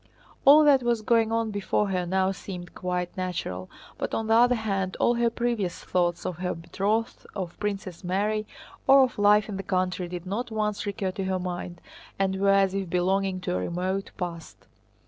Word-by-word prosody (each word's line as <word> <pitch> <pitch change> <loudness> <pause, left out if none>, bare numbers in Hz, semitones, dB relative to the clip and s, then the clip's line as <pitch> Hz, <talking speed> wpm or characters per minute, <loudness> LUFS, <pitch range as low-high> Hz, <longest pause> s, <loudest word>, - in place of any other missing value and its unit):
All 295 +3 +9
that 285 -3 +5
was 235 -2 0
going 225 0 +3
on 225 -1 0
before 205 0 0
her 180 -2 -1
now 190 +1 +2
seemed 180 -2 -8
quite 180 -1 -3
natural, 170 - -4 0.3
but - - -2
on 225 - -1
the 220 - +2
other 245 +2 +5
hand 195 -4 -2
all 240 - +4
her 235 0 +2
previous 230 -6 -2
thoughts 175 -1 0
of 175 - -3
her 180 0 -2
betrothed, 205 +7 -2
of 185 -4 -4
Princess 195 -4 -4
Mary, 210 +4 0 0.4
or 270 0 +8
of 250 -4 -2
life 205 0 +5
in 205 -3 -5
the - - -3
country 185 -1 -1
did 175 0 -6
not 220 +6 -3
once 210 -2 -2
recur 195 -2 -2
to 195 +1 -4
her 190 0 0
mind 175 -1 -5 0.4
and 190 -1 0
were 200 +1 +2
as 195 -1 +4
if 195 -2 -2
belonging 185 +1 0
to 180 - -2
a 90 - 0
remote 185 - -2
past. 170 -3 -6
195 Hz, 190 wpm, -26 LUFS, 180-215 Hz, 0.4 s, All